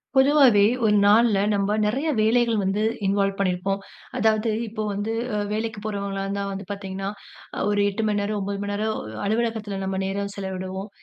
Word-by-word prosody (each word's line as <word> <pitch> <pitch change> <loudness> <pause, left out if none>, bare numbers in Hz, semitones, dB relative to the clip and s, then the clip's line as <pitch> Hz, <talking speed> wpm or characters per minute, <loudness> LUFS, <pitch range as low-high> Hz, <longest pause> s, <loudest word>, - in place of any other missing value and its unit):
பொதுவாவே 265 -6 +6 0.2
ஒரு 210 -1 +4
நாள்ல, 215 +1 +5 0.2
நம்ப 200 0 +1
நெறைய 270 +9 0
வேலைகள் 225 0 +3
வந்து 195 +3 0 0.2
இன்வால்வ் 195 0 +1
பண்ணியிருப்போம். 195 +1 0 0.4
அதாவது 220 0 +2 0.2
இப்போ 215 0 -4
வந்து 205 +3 -2 0.4
வேலைக்கு 220 0 -3
போறவங்களா 200 -2 -3
இருந்தா 200 0 -2
வந்து 195 0 -6
பார்த்தீங்கன்னா, 195 -1 -4 0.6
ஒரு 205 0 +1
8 215 +3 -3
மணி 205 -1 +1
நேரம், 210 +1 -2
9 200 0 -3
மணி 205 - -3
நேரம் 215 +1 -1 0.3
அலுவலகத்தில 220 -2 -1
நம்ம 190 0 -2
நேரம் 200 +1 -2
செலவிடுவோம். 190 0 -5
205 Hz, 150 wpm, -24 LUFS, 195-220 Hz, 0.6 s, பொதுவாவே